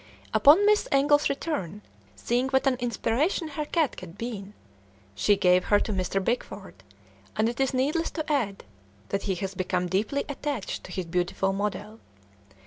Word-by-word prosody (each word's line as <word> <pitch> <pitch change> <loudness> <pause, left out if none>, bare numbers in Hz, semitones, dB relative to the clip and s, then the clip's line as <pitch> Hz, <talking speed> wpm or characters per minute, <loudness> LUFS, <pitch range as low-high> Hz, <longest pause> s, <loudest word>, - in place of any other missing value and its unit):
Upon 320 +9 +6
Miss 420 0 +3
Engle's 290 +2 +4
return, 210 - -3 0.3
seeing 245 - 0
what 265 +1 +2
an 270 - +4
inspiration 245 - 0
her 300 0 -4
cat 315 -2 0
had 180 +1 -11
been, 210 -4 -6 0.6
she 105 - +3
gave 180 0 +4
her 205 - +4
to 215 - -2
Mr. 190 +1 -1
Bickford, 200 - -4 0.5
and 215 +1 +2
it 235 +1 -4
is 270 -1 +2
needless 290 +6 0
to 315 -2 -4
add 235 -10 -1 0.5
that 200 - -1
he 190 - +1
has 190 +2 -4
become 180 -1 -1
deeply 205 +10 -1
attached 285 -5 -4
to - - -10
his 185 -1 -3
beautiful 180 +3 0
model. 210 +2 -4
225 Hz, 160 wpm, -27 LUFS, 195-280 Hz, 0.6 s, Upon